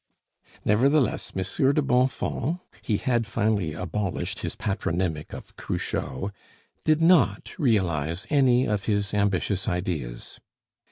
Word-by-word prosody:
Nevertheless, 130 +5 +2
Monsieur 95 +9 +1
de 150 - +2
Bonfons 130 +4 +1 0.2
(he 105 - 0
had 120 -3 0
finally 105 -7 0
abolished 90 +2 -3
his - - -4
patronymic 90 -6 -2
of - - -9
Cruchot) 70 +11 -3 0.5
did 155 +1 +3
not 175 +1 +4
realize 85 - +1
any 130 -3 +4
of 105 -4 -1
his 100 -2 0
ambitious 100 -1 0
ideas. 80 -10 -3
105 Hz, 110 wpm, -26 LUFS, 90-125 Hz, 0.5 s, not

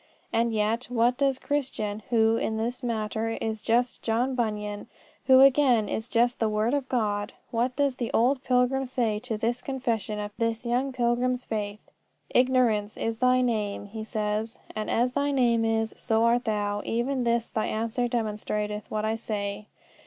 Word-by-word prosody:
And 230 +1 +2
yet, 220 +3 0
what 240 0 +2
does 275 -1 +1
Christian, 250 -8 -2
who, 225 -2 +4
in 220 -1 -1
this 235 +4 -2
matter, 225 -1 -2
is 220 -1 -3
just 240 +2 +1
John 240 +4 0
Bunyan, 210 -4 -2 0.4
who 260 0 +8
again 265 -5 +5
is 220 +3 -3
just 240 +1 +2
the 220 - +2
word 215 +4 +1
of 280 -2 -1
God 205 -4 -1 0.2
what 245 +2 0
does 280 -2 +1
the 235 - -3
old 255 +3 +2
pilgrim 255 +1 +2
say 230 -4 0
to 230 -1 -4
this 235 +3 -1
confession 235 -5 -2
of 205 0 -4
this 230 +1 -1
young 250 +3 0
pilgrim's 250 0 0
faith? 210 -1 -4 0.5
"Ignorance 245 -5 +2
is 225 0 -2
thy 255 0 +4
name," 215 -5 -1
he 220 +2 -7
says, 215 +1 -2 0.2
"and 215 0 -3
as 245 +2 +2
thy 285 +2 0
name 240 -4 +2
is, 225 0 0
so 225 -1 +1
art 240 +1 +3
thou: 205 -2 -1
even 250 +3 -1
this 235 -1 +1
thy 215 - -1
answer 230 +3 -1
demonstrateth 210 -2 -3
what 215 0 -2
I 220 - +1
say. 210 -2 -4
230 Hz, 170 wpm, -27 LUFS, 215-250 Hz, 0.5 s, who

